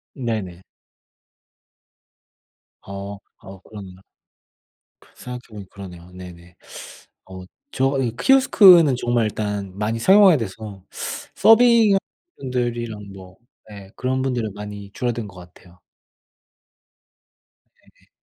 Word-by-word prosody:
네네. 105 -9 -4 2.2
어. 100 +1 -8 0.2
아 95 0 -13
그러네요. 100 -4 -10 1.0
그 - - -24
생각해보니 115 -6 -10
그러네요. 90 -3 -12
네네. 90 -1 -13 0.8
어 95 0 -9 0.3
저 135 +1 +1
이 120 -3 -2
키오스크는 185 - +6
정말 120 -2 0
일단 105 -2 -4
많이 105 +2 -2
사용하게 190 - +6
돼서 105 -3 -7 0.5
서빙하는 225 -3 +5 0.4
분들이랑 120 -5 -4
뭐 95 -1 -14 0.3
예 100 -2 -12
그런 130 +1 -2
분들은 120 -6 -2
많이 105 -1 -9
줄어든 120 0 -3
것 100 - -15
같아요. 90 0 -17 1.9
네네. - - -30
105 Hz, 215 characters per minute, -21 LUFS, 95-125 Hz, 2.2 s, 키오스크는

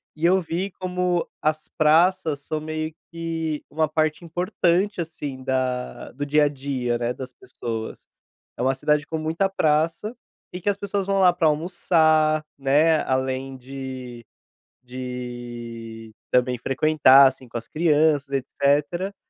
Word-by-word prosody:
E 160 +2 -2
eu 185 +2 +4
vi 180 +4 -3
como 180 -1 -1
as 155 0 0
praças 160 0 +3
são 155 +2 -4
meio 155 0 -4 0.2
que 165 -2 -3
uma 155 +1 +1
parte 155 +1 0
importante, 180 +2 0
assim, 145 -5 -6
da 130 -1 -2
do 145 +2 -4
dia 150 +1 +4
a - - +4
dia, 130 -4 -2
né, 120 +1 -1
das 130 -1 -8
pessoas. 115 -3 -6 0.5
É - - -4
uma 130 +2 +2
cidade 150 +2 +1
com 160 - -3
muita 165 +5 0
praça, 165 +6 0 0.4
e 180 - -6
que 205 - 0
as 200 - 0
pessoas 200 -1 -2
vão 195 0 +1
lá 180 -2 +6
para 170 -3 +2
almoçar, 155 -1 +2
né, 150 +4 +3
além 130 0 -2
de 130 -2 -8 0.6
de 120 -3 -7 0.2
também 125 0 +2
frequentar, 135 +1 +5
assim, 130 -1 -4
com 120 - -5
as 115 - -8
crianças, 155 -2 +2
etcétera, 145 +8 0
150 Hz, 145 wpm, -24 LUFS, 130-165 Hz, 0.6 s, lá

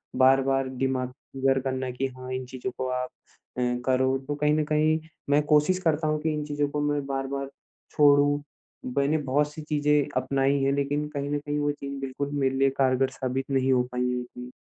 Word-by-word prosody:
बार-बार 135 +1 +4
दिमाग 130 -1 -2 0.4
घर 135 - +3
करना 130 -1 -2
कि 130 +2 -2
हाँ, 130 0 -9
इन 130 0 -3
चीज़ों 130 0 -5
को 130 - -2
आप 125 0 -2 0.5
अ, 125 - 0 0.2
करो 130 0 +2
तो 145 - -1
कहीं 150 +1 +2
न 155 0 +2
कहीं 155 +1 +2 0.3
मैं 145 +1 +4
कोशिश 150 +5 +4
करता 160 -3 +1
हूँ 155 0 +1
कि 155 0 0
इन 150 0 -2
चीज़ों 145 -1 -1
को 145 0 -2
मैं 145 -1 0
बार-बार 135 0 -3 0.4
छोड़ूँ। 145 0 +4 0.5
मैंने 140 +3 +3
बहुत 145 +1 0
सी 155 - -7
चीज़ें 150 -1 +2
अपनाई 135 +1 +1
हैं 135 - +3
लेकिन 145 +1 -1
कहीं 145 -1 -4
न 145 - +1
कहीं 145 0 -3
वो 145 0 +1
चीज़ 140 -1 -6
बिल्कुल 135 +1 -3
मेरे 135 -1 +1
लिए 135 0 +4
कारगर 130 0 +3
साबित 130 0 -3
नहीं 135 -1 +2
हो 125 - +3
पाई 125 - -1
है 125 0 -1
इतनी। 125 0 -10
140 Hz, 200 wpm, -26 LUFS, 130-145 Hz, 0.5 s, बार-बार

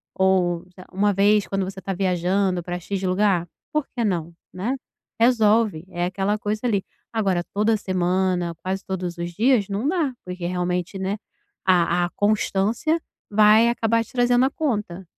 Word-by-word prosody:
Ou, 185 -2 +2
sei 185 - -11
lá, - - -22
uma 205 +2 +2
vez 205 +1 +3
quando 195 -1 -1
você 190 +1 -7
está 195 +1 -4
viajando 185 0 +1
pra 175 +1 -4
X 190 +2 -4
lugar, 185 -2 +2 0.3
por 305 -2 +1
que 240 - 0
não, 170 -4 -1 0.2
né. 215 +9 -2 0.4
Resolve, 220 -7 +3
é 175 -1 -2
aquela 195 +3 -1
coisa 215 0 -3
ali. 200 -5 +1 0.3
Agora, 195 -6 0
toda 215 +2 +2
semana, 185 -2 0
quase 190 +1 -2
todos 180 -2 -4
os 175 0 -4
dias, 225 +1 +3
não 205 +7 -1
dá, 315 -5 0
porque 180 -1 -5
realmente, 180 +1 -2
né, 190 +2 -2 0.5
a 175 -1 +3
a - - -4
constância 215 +9 +1 0.3
vai 215 +2 +6
acabar 230 -1 +1
te - - -18
trazendo 245 0 +3
a 270 - 0
conta. 210 - -2
195 Hz, 165 wpm, -23 LUFS, 180-215 Hz, 0.5 s, vai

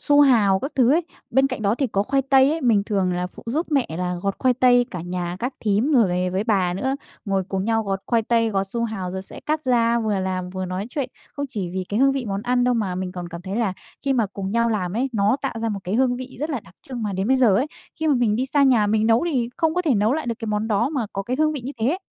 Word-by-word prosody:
su 290 0 +4
hào 220 -9 +5
các 275 - -4
thứ 255 -1 +4
ấy, 335 +3 +2 0.3
bên 265 +3 +4
cạnh 255 -5 -4
đó 200 +1 +2
thì 270 +3 0
có 200 -4 0
khoai 270 +5 +1
tây 270 0 +4
ấy. 320 +2 -1
Mình 230 -7 +3
thường 195 -4 0
là 180 0 -1
phụ 180 - -13
giúp 300 +9 -1
mẹ 275 -4 +2
là 180 0 -1
gọt 195 0 0
khoai 255 -1 +3
tây, 245 -1 +4
cả 180 - -5
nhà 175 0 -4
các 250 +6 -3
thím, 220 +7 +1
rồi 185 -8 +2
với 190 +3 -1
bà 190 -6 +1
nữa, 265 +8 -1 0.3
ngồi 195 -3 0
cùng 190 -1 -2
nhau 225 0 +1
gọt 195 -2 -2
khoai 230 -2 +2
tây, 230 0 +1
gọt 195 -1 0
su 235 +1 -1
hào 195 -5 -4
rồi 190 +1 -5
sẽ - - -11
cắt 310 0 -2
ra 235 -2 +3
vừa 210 -3 0
làm 185 -1 -3
vừa 185 0 -4
nói 185 +2 -4
chuyện. 270 -4 -3 0.2
Không 285 0 -4
chỉ 205 -8 -3
vì 185 0 -3
cái 210 +4 0
hương 275 0 +5
vị 270 -2 -2
món 200 0 -3
ăn 245 +1 +1
đâu, 250 0 +2
mà 205 -6 -1
mình 185 0 -4
còn 180 -2 -6
cảm 170 0 -8
thấy 190 +3 -4
là 220 -5 +1 0.3
khi 275 0 +1
mà 230 -5 +2
cùng 195 0 -5
nhau 235 0 +2
làm 185 -5 -1
ấy 260 +3 +1
nó 210 +3 +2
tạo 275 - -2
ra 225 - 0
một 205 -2 -3
cái 185 - -2
hương 245 +1 +2
vị 255 +1 -8
rất 305 - -2
là 270 -6 -2
đặc 180 -2 -19
trưng, 250 -3 -5
mà 210 -2 -2
đến 190 +1 -1
bây 265 - +4
giờ 245 -7 +4
ấy 265 - +1 0.3
khi 315 - 0
mà 295 - +4
mình 235 -4 +2
đi 255 +3 0
xa 285 +1 +2
nhà 245 -6 +4
mình 215 +1 +2
nấu 230 +6 +3
thì 240 -4 0
không 320 -1 +1
có 360 - +1
thể 305 -7 +2
nấu 215 +3 +2
lại 310 -2 -2
được 235 - -1
cái 225 - -5
món 215 +1 -1
đó 220 +4 +2
mà 270 -7 -2
có 195 - -3
cái 245 +6 -2
hương 310 0 +3
vị 290 - -4
như 255 +4 -6
thế. 265 +11 +1
225 Hz, 300 wpm, -23 LUFS, 195-260 Hz, 0.3 s, hào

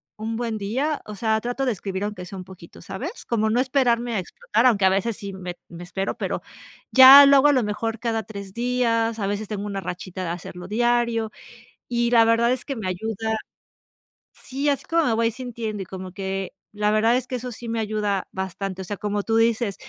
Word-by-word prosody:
un 220 +1 -4
buen 230 -3 -3
día, 265 +10 -1
o 210 - -7
sea, 220 +1 0
trato 245 +3 -2
de 250 - +2
escribir 195 -1 -4
aunque 210 -3 -4
sea 190 +2 -9
un 185 - -6
poquito, 180 -3 -14
¿sabes? 255 - -6
Cómo 220 -2 +1
no 240 +3 +2
esperarme 245 -3 +1
a 215 - 0
explotar, 220 +6 0
aunque 205 -6 +3
a - - +6
veces 200 +3 0
sí 200 -3 -7
me 180 -2 -6
me 170 +1 -9
espero, 195 +2 -3
pero, - - -2 0.5
ya 265 +2 +11
luego 280 0 +6
a - - +6
lo 255 -3 +2
mejor 220 +2 -2
cada 225 -2 -1
3, 200 -2 -9
días, 230 -1 0
a 200 - -1
veces 205 +1 -3
tengo 205 -1 -4
una 200 -1 -4
rachita 185 +1 -6
de 170 - -3
hacerlo 175 +1 -7
diario, 235 0 +1 0.6
y 240 0 0
la 230 -1 +6
verdad 230 +1 +3
es 255 - -4
que 275 - -4
me 215 -6 -4
ayuda. 220 +3 -2 1.0
Sí, 275 +3 -3
así 280 -2 -1
como 330 0 +3
me 235 - +2
voy 230 0 +2
sintiendo, 230 -4 -5
y - - -12
como 185 0 -8
que 195 0 -4 0.2
la 210 0 0
verdad 225 +3 +3
es 255 - -4
que 255 - -4
eso 250 0 -5
sí 235 +1 -9
me 230 0 -1
ayuda 210 -2 -1
bastante, 190 0 -4
o - - -9
sea, 205 - -4
como 205 0 -2
tú 225 - 0
dices, 225 -3 +2
220 Hz, 215 wpm, -23 LUFS, 195-240 Hz, 1.0 s, ya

